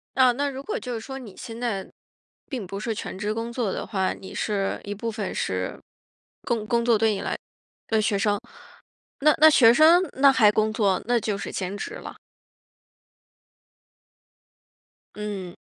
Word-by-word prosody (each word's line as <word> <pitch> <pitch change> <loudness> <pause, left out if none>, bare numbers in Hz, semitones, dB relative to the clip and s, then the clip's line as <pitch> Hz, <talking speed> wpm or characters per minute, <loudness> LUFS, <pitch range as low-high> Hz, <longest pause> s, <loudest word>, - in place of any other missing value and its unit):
啊， 260 -1 +6
那 285 +3 -1
如 270 0 -7
果 - - -3
就 245 +3 -6
是 225 - -4
说 265 +4 -7
你 225 -8 -11
现 230 -1 -8
在 220 -6 -3 0.6
并 245 -8 -4
不 195 +2 -6
是 225 +1 -2
全 195 - -6
职 210 +1 -1
工 230 +1 -4
作 235 -5 -1
的 - - -4
话， 190 -2 0
你 190 - -10
是 200 -2 -1
一 205 - -4
部 230 +3 -4
分 210 -3 -4
是 95 0 -3 0.6
工 225 -3 -2
工 235 0 +1
作 230 -2 +4
对 220 0 +3
你 200 - -3
来 - - -2 0.5
对 220 -1 +2
学 210 -1 +1
生。 205 0 +1 0.8
那 305 +2 +6
那 310 +2 +9
学 235 -6 +7
生 320 +7 +6
那 275 +1 +6
还 215 -5 +5
工 215 +1 +1
作， 200 -4 +1
那 240 0 +3
就 210 -2 -2
是 - - -5
兼 190 +1 -3
职 - - -6
了。 - - -9 3.0
嗯。 200 -4 -5
220 Hz, 190 characters per minute, -25 LUFS, 200-245 Hz, 3.0 s, 那